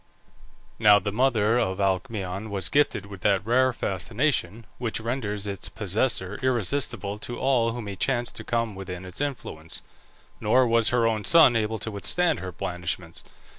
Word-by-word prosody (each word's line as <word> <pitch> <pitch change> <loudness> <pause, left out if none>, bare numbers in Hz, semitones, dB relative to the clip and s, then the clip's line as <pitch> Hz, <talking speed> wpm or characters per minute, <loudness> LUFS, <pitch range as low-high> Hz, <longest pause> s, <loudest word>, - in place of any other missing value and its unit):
Now 105 -2 +7
the 100 +1 -2
mother 115 -1 +2
of 95 -4 0
Alcmaeon 95 +1 -2
was 95 -3 -1
gifted 145 -8 +2
with 100 -2 -10
that 100 0 +2
rare 130 +3 +3
fascination 110 - -1
which 120 -3 -2
renders 110 -3 -3
its 100 -3 -4
possessor 105 -1 -1
irresistible 120 -4 -1
to 120 +2 -6
all 120 -4 +2
who 120 -1 -5
may 100 -2 -6
chance 120 +3 0
to - - -7
come 115 -2 -1
within 95 -1 -7
its 90 +8 -7
influence; 100 - -5 0.6
nor 125 +5 +4
was 115 -1 +3
her 120 -1 +2
own 110 -2 0
son 155 -5 +6
able 110 0 0
to 110 - -4
withstand 165 - +1
her 95 -1 -5
blandishments. 90 -1 -5
110 Hz, 160 wpm, -26 LUFS, 95-120 Hz, 0.6 s, Now